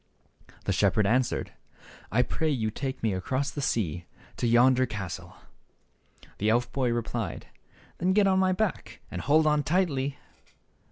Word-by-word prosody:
The - - +1
shepherd 105 - +2
answered, 120 +4 0 0.6
"I 125 +4 +3
pray 160 +4 -1
you 110 -7 0
take 130 +2 -5
me 110 -3 +1
across 130 +9 -2
the 145 - -5
sea, 90 - -1 0.3
to 120 - 0
yonder 125 +2 +4
castle." 100 -6 -6 1.0
The 105 - +1
elf 120 +2 +1
boy 130 -3 0
replied, 120 -1 -3 0.5
"Then 185 +2 +2
get 205 0 +4
on 190 -1 +3
my 185 0 +3
back, 195 +2 -2
and 90 - -4
hold 155 - +3
on 150 -1 +3
tightly." 145 -3 0
130 Hz, 150 wpm, -27 LUFS, 115-150 Hz, 1.0 s, yonder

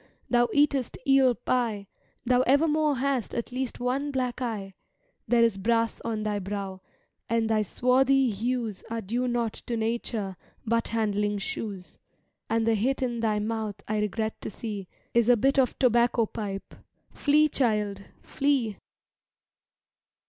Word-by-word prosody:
Thou 240 -1 +4
eat'st 285 -4 +2
eel 270 -2 +5
pie, 230 -4 -1 0.4
Thou 250 +1 +4
evermore 300 +2 +3
hast 265 -2 -1
at 235 +1 -3
least 255 0 -3
one 260 +4 -1
black 255 -2 -2
eye; 210 -5 -3 0.5
There 240 -1 +4
is 225 -4 +2
brass 230 +2 +1
on 220 -2 -2
thy 210 -1 -1
brow, 195 -1 -5 0.5
and 230 0 +1
thy 220 -1 +2
swarthy 260 +4 +3
hues 225 -1 -2
Are 230 0 -2
due 240 +5 -1
not 235 -2 0
to 235 - -1
nature 220 -4 -2 0.3
but 230 +1 +1
handling 210 -2 0
shoes; 195 -2 -6 0.5
And 225 0 +1
the 230 - +3
hit 255 +6 0
in 240 -2 -1
thy 220 -2 +1
mouth, 215 -1 -2
I 215 0 0
regret 220 +1 -2
to - - -4
see, 205 -3 -6 0.3
Is 235 0 +3
a 245 - +6
bit 270 +5 +3
of 255 -2 +2
tobacco 240 -2 +3
pipe—Flee, 225 +8 -1
child, 210 -7 0 0.2
flee! 265 -7 0
230 Hz, 140 wpm, -27 LUFS, 210-255 Hz, 0.5 s, a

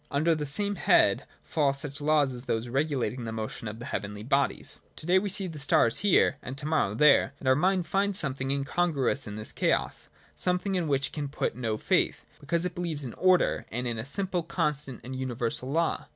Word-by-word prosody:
Under 155 +4 +2
the 150 -2 -3
same 205 +8 -1
head - - +3 0.2
fall 145 -3 +1
such 140 0 -5
laws 145 -3 +3
as 125 +1 -8
those 115 0 -1
regulating 130 -3 -1
the 110 - -4
motion 110 +1 -5
of 105 +1 -6
the 120 - -8
heavenly 105 0 -4
bodies. 135 +3 0 0.2
To - - -7
day 180 +2 +4
we 200 +1 -3
see 195 +1 -2
the 165 -4 -6
stars 125 -4 +3
here, 195 -6 +3
and 130 +2 -7
to 145 - -5
morrow 155 -10 +1
there: 145 +2 +5
and 135 - -7
our 130 - +6
mind 185 +3 +2
finds 200 0 +1
something 135 -6 0
incongruous 140 -1 0
in 105 - -6
this 110 0 -6
chaos— - - -1 0.3
something 180 +2 +2
in 180 -4 0
which 140 -1 +1
it - - -26
can 150 -2 -3
put 145 - -2
no 115 -3 -2
faith, - - +1
be 145 - -16
cause 170 +3 +1
it 180 - -2
beheves 165 -5 -3
in 120 - -6
order 185 -1 +2
and 125 +2 -3
in 115 -2 -2
a - - -3
simple, 185 - -1
constant, 150 -6 -2
and 130 +2 -6
universal 125 -1 -2
law. 165 +3 0
140 Hz, 215 wpm, -28 LUFS, 125-170 Hz, 0.3 s, our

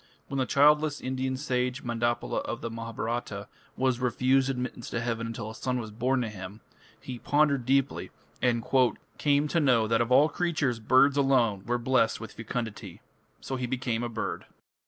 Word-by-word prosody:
When 140 - -2
the 130 - 0
childless 150 +1 +4
Indian 130 0 -2
sage 125 -2 -1
Mandapala 120 0 -1
of 120 - -5
the 115 - -4
Mahabharata 115 -2 -4 0.3
was 130 -2 +1
refused 130 +2 +2
admittance 125 -2 -4
to 115 - -2
heaven 115 -1 -2
until 115 -1 -5
a - - -9
son 125 +2 -2
was 110 -3 -6
born 125 +4 0
to 115 - -3
him, 100 +1 -9 0.4
he 125 +2 -7
"pondered 145 -3 +2
deeply" 135 0 +1 0.3
and 120 -2 +1 0.5
"came 145 0 +3
to 170 - +1
know 125 -7 +3
that 115 +1 +2
of 115 +1 -1
all 140 +4 +6
creatures 155 -7 -1
birds 130 +5 +4
alone 120 -8 +2
were 120 +1 +1
blest 120 -1 +2
with 115 - -8
fecundity"; 110 -5 -5 0.4
so 135 - -4
he 125 -1 -2
became 125 -2 -2
a 120 - -2
bird. 115 -1 -4
125 Hz, 175 wpm, -28 LUFS, 115-135 Hz, 0.5 s, all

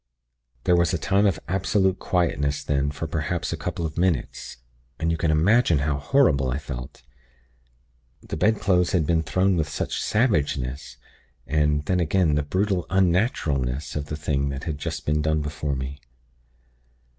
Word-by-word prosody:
"There 90 - +4
was 85 -2 +2
a - - 0
time 100 +2 +2
of 95 - 0
absolute 95 0 +1
quietness 70 -5 0
then 70 -1 0
for 75 +3 -5
perhaps 80 +2 -2
a - - -1
couple 85 - -4
of 80 +1 -4
minutes; 90 -6 -1 0.4
and 80 0 0
you - - +1
can 80 0 0
imagine 85 +4 +4
how 70 0 0
horrible 75 - +3
I 65 - -1
felt. 65 -4 -8 1.2
The - - -5
bedclothes 95 -2 +2
had 85 -5 +2
been 80 +1 +2
thrown 95 +3 +1
with 80 -2 0
such - - -3
savageness! 70 - 0 0.5
And, 75 -1 +1
then 90 +3 +1
again, 85 -1 +2
the 75 - +2
brutal 95 +4 -1
unnaturalness 85 - 0
of 75 -1 -3
the 75 - -4
thing 70 -2 -1
that 70 0 -5
had 75 -3 -4
just - - -4
been 75 0 +1
done 80 0 0
before 75 -1 -3
me! 65 +2 -6
80 Hz, 160 wpm, -24 LUFS, 70-90 Hz, 1.2 s, There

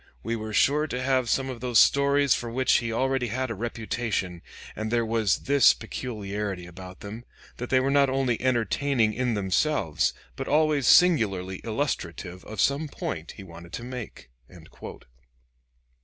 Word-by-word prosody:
We 115 +2 -2
were 110 -1 -5
sure 145 +8 +2
to 125 - -4
have 130 -2 +1
some 135 -1 +1
of 125 -3 -7
those 125 -2 +1
stories 140 +2 +4
for 120 - -3
which 130 +2 +2
he 115 -1 -3
already 130 +1 0
had 130 +2 -2
a - - -1
reputation, 110 -5 -3 0.3
and 110 0 -4
there 120 0 +1
was 110 -3 +1
this 140 0 +5
peculiarity 105 -5 -5
about 90 +1 -11
them, 110 +4 -8 0.3
that 125 - -5
they 130 - +4
were 135 +1 0
not 140 -1 +4
only 130 -3 0
entertaining 120 -1 +1
in 125 0 -1
themselves, 100 - 0 0.2
but - - -5
always 150 -3 +2
singularly 100 - +4
illustrative 95 - -4
of 110 -2 -8
some 140 +7 +1
point 85 - -5
he 100 - -11
wanted 85 -1 -12
to - - -5
make." 125 - -8
120 Hz, 155 wpm, -26 LUFS, 100-135 Hz, 0.3 s, this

